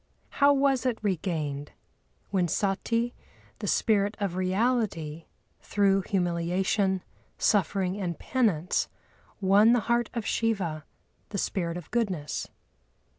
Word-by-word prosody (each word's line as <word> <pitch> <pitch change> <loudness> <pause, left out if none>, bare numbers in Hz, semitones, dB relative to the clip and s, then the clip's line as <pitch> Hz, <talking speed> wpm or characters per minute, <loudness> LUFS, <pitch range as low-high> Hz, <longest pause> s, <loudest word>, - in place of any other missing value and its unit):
How 285 0 +8
was 275 -3 +3
it 240 -3 0
regained? 155 -7 -2 0.6
When 185 -3 +2
Sati, 230 +7 0 0.5
the - - -4
Spirit 205 -2 +2
of 195 -4 -1
Reality, 185 -5 0 0.3
through 195 -1 +2
humiliation, 185 +1 0 0.3
suffering, 195 -1 +1
and 175 -3 -2
penance, 195 - +1 0.5
won 200 +4 +6
the 245 - +3
Heart 235 +2 +1
of 230 -3 -2
Shiva, 190 -11 -1 0.4
the 205 - -4
Spirit 175 -3 -1
of 175 - -10
Goodness. 190 -11 -1
195 Hz, 110 wpm, -28 LUFS, 175-225 Hz, 0.6 s, How